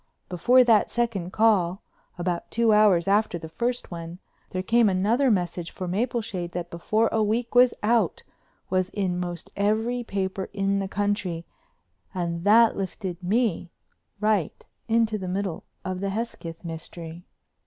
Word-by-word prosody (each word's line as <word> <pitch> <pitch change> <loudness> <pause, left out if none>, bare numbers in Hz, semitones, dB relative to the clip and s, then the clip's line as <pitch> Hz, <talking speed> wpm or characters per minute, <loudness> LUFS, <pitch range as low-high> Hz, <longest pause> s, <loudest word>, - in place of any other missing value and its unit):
Before 245 +9 +5
that 225 -4 +4
second 220 -7 -1
call, 200 -4 +2 0.3
about 175 -1 -2
two 230 -1 +3
hours 205 -5 +4
after 200 -2 +2
the 160 - -8
first 240 +8 -3
one, 170 0 -7 0.3
there 185 0 -3
came 230 +2 +4
another 220 +9 +2
message 175 -4 -1
for 185 - -6
Mapleshade 205 -3 -2
that 175 0 -5
before 215 +7 +1
a 220 - +1
week 225 +3 0
was 245 0 +6
out 230 +2 +2 0.5
was 185 0 +1
in 190 -3 -2
most 175 -2 -5
every 220 +4 0
paper 195 -3 -3
in 200 0 0
the 195 - -2
country 190 -4 -2 0.7
and 170 -2 -2
that 225 +2 +6
lifted 190 -2 -5
me 195 -2 0 0.5
right 210 -6 0 0.2
into 225 -1 +2
the 185 - -5
middle 190 -1 -3 0.2
of 185 -1 -3
the 200 +1 -2
Hesketh 195 -6 -5
mystery. 165 +1 -7
195 Hz, 145 wpm, -25 LUFS, 175-225 Hz, 0.7 s, was